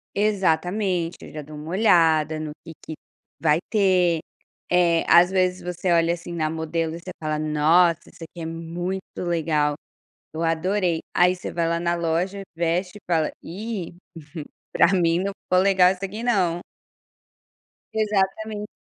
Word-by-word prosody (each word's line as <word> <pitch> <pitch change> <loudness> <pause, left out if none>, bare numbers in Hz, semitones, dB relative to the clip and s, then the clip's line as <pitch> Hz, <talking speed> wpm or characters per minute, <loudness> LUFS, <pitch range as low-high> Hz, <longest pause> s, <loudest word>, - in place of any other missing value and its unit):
Exatamente, 190 -3 0
aí - - -10
eu - - -15
já 155 - -4
dou 155 +2 -11
uma 150 +1 -8
olhada 160 -6 +3
no 155 0 -4 0.2
que 165 - -8
que 160 - -7 0.4
vai 155 -1 +3
ter, 185 -5 +3 0.5
eh, 170 -2 +3
às 175 +1 +7
vezes, 185 -1 +1
você 180 +1 -2
olha 170 0 +3
assim 175 0 -7
na 155 -2 -1
modelo 160 0 -2
e - - -7
você 185 +2 -8
fala: 155 -1 -1
"Nossa, 155 +3 +3
isso - - -13
aqui 165 +1 -10
é - - -4
muito 170 +3 -4 0.2
legal, 155 -4 0 0.6
eu 160 - -4
adorei". 170 +1 0 0.2
Aí 180 +1 +4
você 180 - -7
vai 170 -1 0
lá 170 0 0
na 170 0 0
loja, 170 +4 -1
veste 175 +4 -1
e - - -16
fala: 160 -3 +1
"Ih, 195 -1 -6 0.8
pra - - +5
mim 170 -2 +2
não 195 +2 -1
ficou 185 0 +2
legal 190 -2 +5
isso 190 0 -7
aqui 210 +4 -5
não". 185 -8 +1 1.3
Exatamente. 210 0 -1
175 Hz, 160 wpm, -23 LUFS, 165-190 Hz, 1.3 s, às